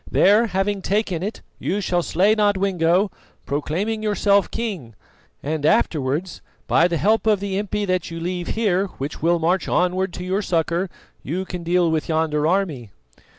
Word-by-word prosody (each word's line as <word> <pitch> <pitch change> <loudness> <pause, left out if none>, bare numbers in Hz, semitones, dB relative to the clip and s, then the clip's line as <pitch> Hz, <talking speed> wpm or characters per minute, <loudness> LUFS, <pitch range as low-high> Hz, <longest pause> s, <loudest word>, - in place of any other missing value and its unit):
There, 210 +4 +4
having 195 0 -1
taken 195 -4 -1
it, 205 +4 -4 0.2
you 200 - -1
shall 175 -3 0
slay 190 +5 +2
Nodwengo, 195 -3 +2 0.3
proclaiming 175 +10 -2
yourself 205 -1 +2
king, 185 - -5 0.5
and 150 +1 -2
afterwards, 155 - +1 0.2
by 170 - +4
the 170 -1 -1
help 220 +6 +2
of 210 -2 +4
the 195 -1 -2
impi 210 0 -2
that 185 -3 -1
you 165 0 -6
leave 175 +1 -3
here 200 -3 +1
which 140 +3 -5
will 170 +1 +3
march 170 +3 0
onward 180 +1 +1
to 180 - -6
your 190 +3 -1
succour, 170 0 0 0.3
you 180 +6 -3
can 180 -1 -6
deal 170 0 +2
with 160 0 -1
yonder 155 -1 +1
army." 165 - -1
180 Hz, 160 wpm, -22 LUFS, 165-200 Hz, 0.5 s, There